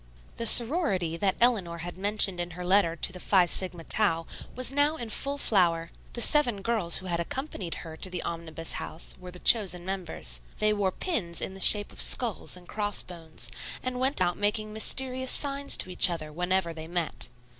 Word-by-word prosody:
The 230 - +1
sorority 230 - +5
that 190 +1 0
Eleanor 205 -9 +1
had 175 +1 -8
mentioned 195 -1 +1
in 175 0 -4
her 180 - -6
letter 180 -3 +2
to 180 - 0
the 180 - -9
Phi 185 -1 +3
Sigma 175 -1 -3
Tau, 165 -4 -1 0.3
was 255 +1 0
now 290 +2 +1
in 235 -7 -6
full 280 +5 -2
flower. 170 -9 0 0.2
The 235 - -3
seven 240 -9 +3
girls 215 -7 +4
who 190 - -4
had 170 -2 -3
accompanied 190 - -5
her 160 -1 -9
to 185 - -2
the 180 -1 -4
Omnibus 165 -1 -5
House 160 - -4
were 180 0 -10
the 180 - -10
chosen 180 -4 +2
members. 165 - -4 0.2
They 215 0 +1
wore 200 -2 -1
pins 185 - -3
in 190 - -4
the 195 - -12
shape 205 +2 +4
of - - -5
skulls 225 -6 -1
and 175 -1 -16
cross 205 -2 -2
bones, 160 -8 -7 0.3
and 255 -1 -4
went 265 +2 +1
about 175 -1 0
making 210 +1 -1
mysterious 260 +3 +2
signs 280 0 +1
to 185 - -1
each 180 - +8
other 155 -3 -6
whenever 180 0 -1
they 160 0 -9
met. 170 -7 -3
185 Hz, 195 wpm, -27 LUFS, 170-225 Hz, 0.3 s, each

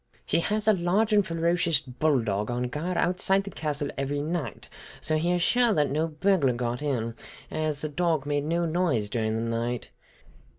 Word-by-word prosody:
He - - +1
has 210 +5 -1
a 215 - +7
large 195 +4 +1
and 205 -1 +5
ferocious 170 -1 +1
bulldog 125 -6 0
on 120 0 -1
guard 170 +7 -3
outside 190 +2 +2
the 200 - -7
castle 145 -2 -3
every 140 +1 -1
night, 160 +1 -3 0.3
so 155 - -1
he 170 +3 +1
is 175 -1 +1
sure 245 +2 +3
no 155 +4 0
burglar 155 -4 +2
got 120 +1 -2
in, 120 -6 -1 0.4
as 155 -2 -2
the 155 - -2
dog 160 -2 0
made 145 0 -1
no 170 +2 0
noise 160 - 0
during 110 -2 0
the 115 - -1
night. 120 +1 -3
155 Hz, 175 wpm, -27 LUFS, 130-175 Hz, 0.4 s, a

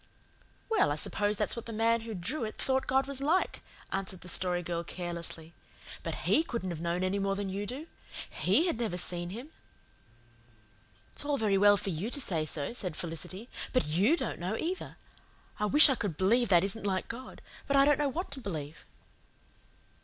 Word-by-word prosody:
"Well, 445 - +3
I - - +1
suppose 205 +6 0
that's 210 - +1
what 235 - -7
the - - -5
man 225 +1 +2
who 225 -1 -6
drew 230 - -2
it 215 - -4
thought 265 0 +1
God 265 +1 +3
was 275 -1 -2
like," 315 +7 +1 0.3
answered 190 -1 -2
the 180 - -9
Story 180 0 0
Girl 170 0 -2
carelessly. 170 -2 -4 0.5
"But - - -3
HE - - +5
couldn't 230 - -3
have 165 -2 -5
known 170 +2 -1
any 190 +2 0
more 195 0 0
than 200 -1 -3
you 200 +2 -3
do. 270 +7 -5 0.5
HE 330 - +3
had 335 -10 0
never 215 -7 -1
seen 175 -1 +1
Him." 240 +10 -7 1.6
"It's - - -3
all 290 -1 0
very 210 -4 +2
well 205 0 +7
for 195 - -2
you 175 +7 -3
to 285 - +1
say 160 - -1
so," 145 +5 -3
said 185 -9 -4
Felicity, 175 +7 -5 0.3
"but 255 - +3
YOU 190 - +3
don't - - -3
know 185 +6 -2
either. 360 +3 -4 0.6
I 210 - +1
wish 295 +9 +8
I 270 - +3
could 200 - -3
believe 235 +5 +3
that 175 -2 +6
isn't 200 +2 0
like 190 -2 -1
God 255 +3 -8 0.3
but 280 - +2
I 275 - +7
don't 295 +1 +4
know 290 -1 +2
what 335 +5 -4
to 275 -1 -4
believe." 155 - -6
205 Hz, 200 wpm, -31 LUFS, 175-255 Hz, 1.6 s, wish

